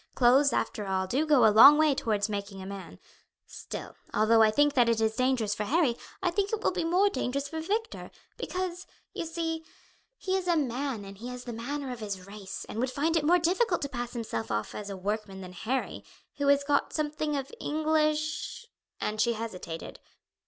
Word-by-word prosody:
Clothes, 260 +3 +5
after 210 -3 -2
all, 190 0 0
do 275 +11 0
go 290 -4 +5
a 215 - +6
long 275 +7 +10
way 310 -2 +4
towards 215 -5 0
making 200 -2 -5
a 190 - -7
man. 195 0 -8 0.5
Still, - - -8 0.2
although 220 +1 +4
I 220 - +6
think 290 +6 +3
that 245 -3 +4
it 230 -1 +2
is 220 0 +1
dangerous 255 -4 +1
for 210 - -3
Harry, 285 -1 +2 0.3
I 355 - +2
think 400 +2 0
it 440 -1 -2
will - - +3
be 350 - -2
more 360 +5 +3
dangerous 280 -8 -2
for 320 +2 -5
Victor; 440 +7 -3 0.3
because, 365 0 -4 0.3
you 335 - -4
see, 325 0 -3 0.5
he 375 0 -1
is 375 -1 -2
a 345 -2 +3
man 260 -5 -2
and 195 0 -11
he 240 - -7
has 250 0 -7
the 240 - -6
manner 265 +4 -4
of 245 - -6
his 200 -4 -5
race, 200 -1 -8
and 220 - -5
would 255 +2 +1
find 295 +6 0
it 320 - +2
more 345 +4 +5
difficult 355 +2 +1
to 280 - -2
pass 240 -3 -5
himself 220 - -4
off 105 0 -2
as 205 -1 -6
a 195 - -5
workman 200 0 -3
than 180 -1 -9
Harry, 245 +8 -3 0.3
who 285 -1 0
has 280 0 +5
got 285 0 +1
something 300 -1 -1
of 275 +2 -5
English" 310 +5 0 0.3
and 215 0 -1
she 235 +1 +3
hesitated. 185 -8 -6
260 Hz, 205 wpm, -29 LUFS, 215-310 Hz, 0.5 s, long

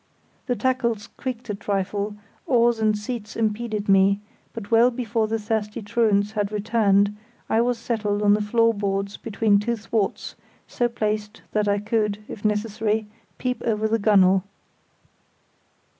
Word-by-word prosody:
The 245 - +1
tackles 235 -5 -1
creaked 250 -2 -5
a - - -2
trifle, 200 +1 -2 0.3
oars 235 -3 +3
and 215 -1 +2
seats 215 0 -6
impeded 215 -1 -1
me; 195 0 +4 0.3
but 225 -2 -8
well 230 +2 +6
before 230 -3 -1
the 225 +1 -1
thirsty 215 -1 -3
truants 205 -1 +2
had 205 -2 -2
returned 205 -1 +2 0.3
I 225 - +2
was 245 0 +1
settled 210 -3 -1
on 205 0 +5
the 210 - +2
floor 230 +2 +3
boards 200 -1 -2
between 210 -2 +2
two 235 +3 -1
thwarts, 215 -2 -2 0.3
so 240 - 0
placed 215 -2 -3
that 210 -1 +1
I 200 0 +2
could, 210 0 0
if 205 - -9
necessary, 215 +1 0 0.3
peep 250 -2 -2
over 220 -1 0
the 225 +1 +1
gunwale. 195 -3 +4
215 Hz, 145 wpm, -24 LUFS, 205-230 Hz, 0.3 s, well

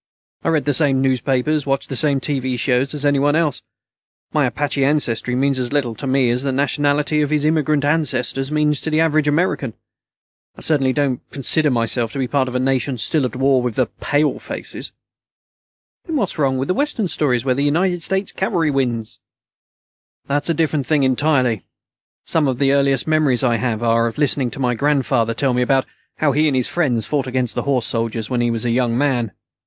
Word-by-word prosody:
I - - 0
read 160 -3 +1
the 145 - +1
same 135 -2 +2
newspapers 135 +3 +1
and - - -13
watch 135 0 -1
the 135 - -4
same 140 -1 +1
TV 130 -2 -2
shows 130 +3 0
as 145 0 -3
anyone 145 +1 +2
else. 155 -4 0 0.7
My - - +2
Apache 145 -1 -1
ancestry 125 -4 0
means 135 0 +1
as 125 -1 -2
little 140 -5 0
to 135 - -6
me 130 -2 +2
as 125 +1 0
the 135 0 -1
nationality 145 +2 +1
of 145 - 0
his 150 -1 +1
immigrant 155 -2 +1
ancestors 135 -3 0
means 150 -1 +1
to - - -3
the 155 0 +1
average 155 -2 +2
American. 145 -6 0 0.8
I - - -13
certainly 135 -4 +1
don't 135 -3 -1
consider 150 +2 +1
myself 115 -2 0
to - - -5
be 130 -2 -1
part 135 0 0
of 125 - -6
a - - +1
nation 130 0 0
still 135 +6 +1
at 125 - -4
war 135 0 +2
with 120 -3 -3
the 130 - +2
'palefaces'." 145 +1 -2 1.1
"Then 325 - -4
what's 200 - -1
wrong 135 -2 +1
with 135 +7 -1
Western 230 -1 0
stories 130 -7 0
where 130 - +2
the 135 - -2
United 175 +4 +1
States 190 +3 -2
Cavalry 170 -5 0
wins?" 120 -5 -2 1.1
"That's 145 +3 -1
a 165 - +1
different 150 -3 0
thing 150 -3 +2
entirely. 130 - +1 0.6
Some 155 -3 +1
of 130 -2 -1
the 135 0 +2
earliest 140 -2 +2
memories 155 -5 +2
I 120 -2 +2
have 120 -2 -2
are 115 0 +2
of 115 - -6
listening 145 -3 +1
to 135 - -8
my 125 -2 +1
grandfather 120 -3 +1
tell 135 +1 +1
me 125 - +1
about 130 +1 +2 0.3
how 155 -2 +2
he 150 +3 +2
and 140 - +1
his 130 -2 +3
friends 130 -10 0
fought 140 -3 -1
against 125 -2 -1
the - - -2
horse 130 -4 +1
soldiers 115 0 -2
when 125 -1 +1
he 120 - +1
was 115 0 -2
a 120 - +1
young 120 -1 +1
man. 125 -6 0
135 Hz, 200 wpm, -19 LUFS, 125-150 Hz, 1.1 s, his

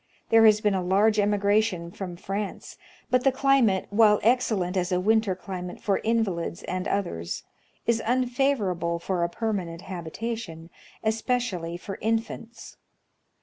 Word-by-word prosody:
There 225 0 +7
has 215 0 +5
been 210 -1 +2
a 190 - 0
large 205 +4 +3
emigration 205 -3 +1
from 180 -1 -6
France; 195 +3 -5 0.4
but 255 0 +3
the 270 - +4
climate, 265 -8 +3
while 210 0 +5
excellent 220 -6 +2
as 180 0 0
a 180 - +2
winter 215 0 +2
climate 180 -1 -7
for 200 -2 0
invalids 210 -8 -1
and 185 +1 -3
others, 85 - -2 0.4
is 230 -1 +2
unfavorable 240 -9 0
for 175 +1 -2
a 170 - 0
per 220 +4 -2
manent 170 -4 -4
habitation, 175 -1 -6 0.3
especially 220 -6 -1
for 195 +2 -7
infants. 225 +1 -3
205 Hz, 140 wpm, -26 LUFS, 180-225 Hz, 0.4 s, There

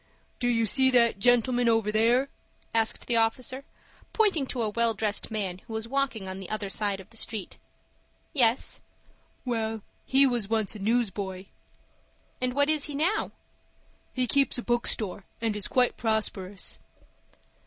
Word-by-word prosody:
"Do 245 - 0
you 230 -2 +2
see 265 +5 +4
that 235 -5 +3
gentleman 245 +1 +3
over 225 -2 +2
there?" 235 +5 +3 0.4
asked 225 -1 0
the 235 - +2
officer, 255 +4 0 0.5
pointing 385 - +2
to 245 -3 -1
a 215 - 0
well 230 +1 +1
dressed 210 0 -1
man 195 -5 -3
who 225 - -11
was 220 0 -3
walking 260 -6 -1
on 190 0 -5
the 190 - -8
other 210 -2 -3
side 205 -2 -1
of 190 +3 -13
the 230 - -11
street. 220 -3 -4 0.7
"Yes." 245 -3 +2 0.6
"Well, 225 -3 -2 0.2
he 270 +1 +5
was 240 -6 0
once 220 -3 0
a - - -7
newsboy." 200 -4 -1 1.0
"And 250 0 0
what 285 0 +3
is 305 -2 +3
he 295 - -5
now?" 345 +9 +1 0.8
"He 255 -1 0
keeps 275 +2 +2
a 245 - -4
bookstore, 220 -5 -1
and 225 -2 -1
is 210 - -2
quite 250 -1 +2
prosperous." 205 -4 -2
230 Hz, 155 wpm, -27 LUFS, 210-255 Hz, 1.0 s, he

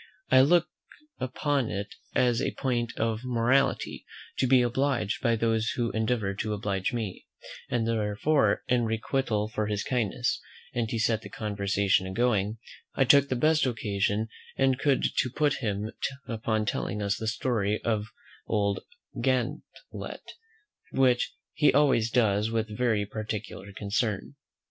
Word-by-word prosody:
I 130 - +8
look 170 +5 +4 0.5
upon 135 0 0
it 100 +1 -4 0.2
as 120 -2 +3
a - - -1
point 120 -3 -1
of 110 +1 -1
morality, 125 +2 +1 0.4
to 130 - +3
be 125 -1 +5
obliged 120 -3 0
by 115 -3 +2
those 115 0 +1
who 120 -2 0
endeavour 110 -2 0
to 105 +2 -2
oblige 100 0 -1
me; 110 -6 -4 0.4
and 115 -2 0
therefore, 115 +7 +1
in 125 -2 +2
requital 110 -1 0
for 105 -1 -2
his 105 -1 -1
kindness, 125 0 -1 0.3
and 115 -2 -1
to 115 - -2
set 110 0 +1
the - - -9
conversation 100 -2 0
a 95 - -5
going, 110 -2 +1 0.4
I 135 - +4
took 140 +2 +6
the 130 - 0
best 155 +2 +3
occasion 105 -2 -1 0.3
I 135 -1 +4
could 140 +1 +1
to 125 - +2
put 145 +3 +1
him 105 -1 -2 0.4
upon 110 -1 -1
telling 105 - -2
us 100 -1 0
the 110 - -3
story 110 -2 0
of 110 -2 0 0.4
old 100 -2 +1 0.4
Gantlett, 130 - -3 0.6
which 130 -2 +2 0.2
he 150 0 +4
always 135 -5 +3
does 110 -3 +2
with 110 -1 -2
very 110 -3 +1
particular 105 -2 -6
concern. 105 +3 -2
115 Hz, 145 wpm, -28 LUFS, 105-125 Hz, 0.6 s, I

